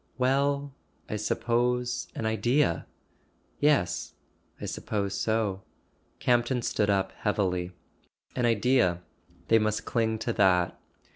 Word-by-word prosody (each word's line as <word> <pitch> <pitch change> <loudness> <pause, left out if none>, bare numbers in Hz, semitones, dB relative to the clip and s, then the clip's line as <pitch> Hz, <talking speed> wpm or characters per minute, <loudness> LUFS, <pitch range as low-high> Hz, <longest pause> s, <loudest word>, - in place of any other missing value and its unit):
"Well—I 140 -1 -1
suppose, 120 +3 0
an 115 - -3
Idea." 110 - +1 0.7
"Yes. 145 -11 +1 0.4
I - - -5
suppose 100 -2 -3
so." 105 -2 0 0.6
Campton 120 0 +1
stood 105 -2 0
up 95 -1 +1
heavily. 90 -4 0 0.6
An 125 -2 +2
Idea: 115 -6 +2 0.5
they 115 - +6
must 110 0 -1
cling 110 -2 0
to 115 +1 -2
that. 90 -4 +3
115 Hz, 100 wpm, -28 LUFS, 100-125 Hz, 0.7 s, they